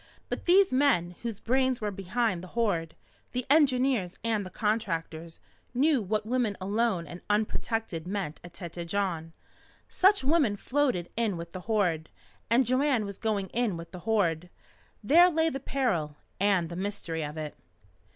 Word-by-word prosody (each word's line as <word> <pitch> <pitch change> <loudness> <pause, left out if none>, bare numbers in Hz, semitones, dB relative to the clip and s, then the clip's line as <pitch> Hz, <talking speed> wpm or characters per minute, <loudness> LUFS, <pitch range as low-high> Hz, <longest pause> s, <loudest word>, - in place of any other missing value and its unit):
But - - -4
these 380 +2 +6
men 240 -11 +2
whose 230 -3 -4
brains 260 +2 +1
were 210 -1 -2
behind 195 0 -1
the 185 - -12
Horde 170 -8 0 0.4
the 250 0 -2
engineers 260 - +3
and 220 -3 0
the 185 - -7
contractors 170 -6 -2 0.4
knew 280 0 +3
what 210 +2 -1
women 235 -3 0
alone 200 -2 0
and 175 +2 -9
unprotected 210 -4 -1
meant 185 -6 -3
at 175 - -10
Tête 170 -1 -6
Jaune. 170 -4 -2 0.6
Such 390 -3 +4
women 280 -7 +3
floated 250 -7 0
in 225 -5 0
with 170 0 -7
the 185 +2 -9
Horde. 175 -8 +1 0.4
And 240 +3 +4
Joanne 255 -2 +2
was 200 -1 -7
going 205 -4 -1
in 230 -6 0
with 165 0 -9
the 180 - -8
Horde. 180 -5 0 0.5
There 340 - +7
lay 325 -1 +2
the 270 - -4
peril 225 - -1 0.2
and 190 -4 +2
the 170 - -6
mystery 180 -4 -3
of 150 +1 -6
it. 155 -1 -5
205 Hz, 160 wpm, -28 LUFS, 175-250 Hz, 0.6 s, There